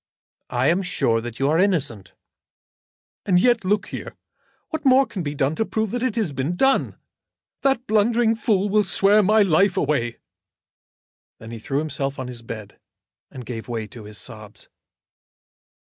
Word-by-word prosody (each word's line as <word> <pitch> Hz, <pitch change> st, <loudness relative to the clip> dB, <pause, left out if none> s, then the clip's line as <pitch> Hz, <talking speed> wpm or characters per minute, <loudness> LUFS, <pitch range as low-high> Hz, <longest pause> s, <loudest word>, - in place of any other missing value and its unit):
"I 125 Hz, 0 st, 0 dB
am 170 Hz, +6 st, +3 dB
sure 115 Hz, -11 st, 0 dB
that 120 Hz, 0 st, -7 dB
you 135 Hz, -, +1 dB
are 155 Hz, +3 st, +2 dB
innocent." 150 Hz, -, 0 dB, 1.1 s
"And 180 Hz, -2 st, +3 dB
yet, 240 Hz, +1 st, +3 dB
look 200 Hz, +2 st, 0 dB
here. -, -, -7 dB, 0.5 s
What 315 Hz, -2 st, -4 dB
more 270 Hz, 0 st, +5 dB
can 195 Hz, -, -6 dB
be 145 Hz, -2 st, -4 dB
done 140 Hz, +1 st, +1 dB
to -, -, +2 dB
prove 220 Hz, -1 st, -2 dB
it 245 Hz, -, 0 dB
than 255 Hz, -2 st, -1 dB
has 215 Hz, -9 st, 0 dB
been 140 Hz, +5 st, -2 dB
done? 270 Hz, +8 st, +2 dB, 0.7 s
That 270 Hz, -3 st, +1 dB
blundering 225 Hz, +1 st, +2 dB
fool 210 Hz, -3 st, +1 dB
will 210 Hz, +1 st, +3 dB
swear 200 Hz, +2 st, +4 dB
my 210 Hz, +2 st, +4 dB
life 190 Hz, +1 st, +3 dB
away." 120 Hz, -9 st, 0 dB, 1.2 s
Then 115 Hz, +1 st, -11 dB
he 115 Hz, -, -7 dB
threw 135 Hz, +5 st, -3 dB
himself 140 Hz, -2 st, -2 dB
on 130 Hz, -2 st, -5 dB
his 120 Hz, -2 st, -8 dB
bed, 110 Hz, -3 st, -9 dB, 0.5 s
and 125 Hz, -2 st, -10 dB
gave 115 Hz, +1 st, -6 dB
way 115 Hz, -2 st, -3 dB
to 115 Hz, -4 st, -11 dB
his 105 Hz, 0 st, -10 dB
sobs. 110 Hz, +1 st, -11 dB
170 Hz, 165 wpm, -22 LUFS, -, 1.2 s, more